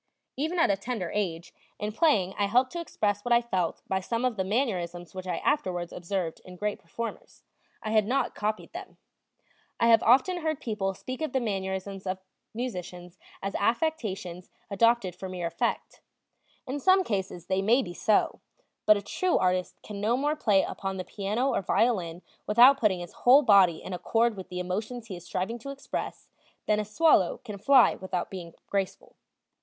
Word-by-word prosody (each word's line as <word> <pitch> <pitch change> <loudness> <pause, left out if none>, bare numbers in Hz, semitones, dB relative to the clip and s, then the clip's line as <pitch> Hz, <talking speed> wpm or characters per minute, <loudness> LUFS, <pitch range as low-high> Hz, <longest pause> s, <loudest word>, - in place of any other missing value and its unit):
Even 315 +6 -2
at 330 - +4
a - - +2
tender 195 -3 -4
age, 175 -5 -3 0.2
in 210 0 -3
playing 215 - +2
I 205 - +1
helped 250 +5 +3
to 345 - -4
express 205 - -1
what 245 - -3
I 235 - +7
felt 190 -8 -2
by 190 - 0
some 230 +6 -2
of 250 -3 0
the 190 - -1
mannerisms 180 - -2
which 185 0 -7
I 175 -2 -1
afterwards 180 - -1
observed 175 -2 -3
in 185 - -11
great 210 +3 -2
performers; 235 - -7 0.4
I 215 - -3
had 215 -2 +3
not 265 +4 0
copied 215 +5 -3
them. 365 +2 -9 0.8
I 230 - +4
have 225 - +7
often 270 +10 +4
heard 315 -3 -2
people 200 -4 -2
speak 255 +7 -7
of 310 -5 -2
the 265 - +2
mannerisms 195 -3 -3
of 185 0 -1 0.3
musicians 180 -6 -6 0.2
as 195 0 -2
affectations 205 - -1 0.2
adopted 215 -3 +2
for 190 +1 -7
mere 180 -2 -4
effect; 170 - -2 0.6
in 275 +2 -3
some 375 +5 +5
cases 190 - -3
they 190 +1 0
may 235 +7 +3
be 175 - -7
so; 210 +3 +1 0.5
but 215 - +7
a 200 - -6
true 365 - 0
artist 185 0 0
can 205 -1 -7
no 225 +4 +2
more 295 +3 0
play 210 -9 +3
upon 195 -1 -4
the 185 - -4
piano 215 +7 -1
or - - +1
violin 180 -5 0 0.2
without 245 +6 +7
putting 195 -7 +2
his 175 - -8
whole 265 +4 +6
body 195 - +5
in 190 - -6
accord 225 +6 +1
with 190 -2 -9
the 180 - -6
emotions 215 +6 -4
he 190 - -5
is 175 0 -11
striving 190 +7 -3
to 275 - -8
express 275 0 -6 0.3
than 210 0 +2
a 210 - -2
swallow 215 - +3
can 210 -4 -7
fly 260 +3 +6
without 185 -2 -4
being 175 -3 -8
graceful. 195 -2 -3
205 Hz, 185 wpm, -28 LUFS, 185-245 Hz, 0.8 s, I